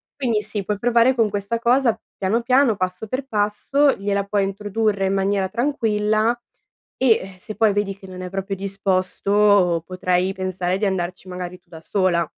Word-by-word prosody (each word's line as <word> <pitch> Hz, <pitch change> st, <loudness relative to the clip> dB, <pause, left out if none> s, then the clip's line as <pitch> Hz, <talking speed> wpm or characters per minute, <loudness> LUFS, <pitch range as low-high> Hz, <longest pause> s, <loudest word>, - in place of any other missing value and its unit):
Quindi 235 Hz, -6 st, 0 dB
sì, 205 Hz, -1 st, -4 dB
puoi 205 Hz, 0 st, -2 dB
provare 240 Hz, +2 st, +4 dB
con 225 Hz, -3 st, +2 dB
questa 205 Hz, +3 st, -2 dB
cosa, 240 Hz, 0 st, +3 dB, 0.2 s
piano 205 Hz, +5 st, 0 dB
piano, 250 Hz, -1 st, +3 dB
passo 185 Hz, +2 st, -3 dB
per 260 Hz, +5 st, -3 dB
passo, 225 Hz, +6 st, +2 dB
gliela 200 Hz, 0 st, -1 dB
puoi 200 Hz, 0 st, 0 dB
introdurre 205 Hz, 0 st, -1 dB
in 190 Hz, -, +1 dB
maniera 195 Hz, 0 st, +1 dB
tranquilla, 225 Hz, -4 st, +1 dB, 0.6 s
e, 260 Hz, -, +1 dB, 0.2 s
eh, -, -, -8 dB
se 215 Hz, +3 st, -8 dB
poi 215 Hz, -3 st, +3 dB
vedi 205 Hz, -1 st, -1 dB
che 195 Hz, -, -13 dB
non 185 Hz, -1 st, -8 dB
è 180 Hz, -, -5 dB
proprio 195 Hz, +1 st, -3 dB
disposto, 195 Hz, -1 st, +2 dB
potrai 185 Hz, 0 st, 0 dB
pensare 185 Hz, -1 st, -2 dB
di 210 Hz, -, -1 dB
andarci, 185 Hz, -1 st, -2 dB
magari, 180 Hz, 0 st, -6 dB
tu -, -, -48 dB
da 160 Hz, -1 st, -11 dB
sola. 175 Hz, -1 st, +1 dB
200 Hz, 175 wpm, -22 LUFS, 185-225 Hz, 0.6 s, provare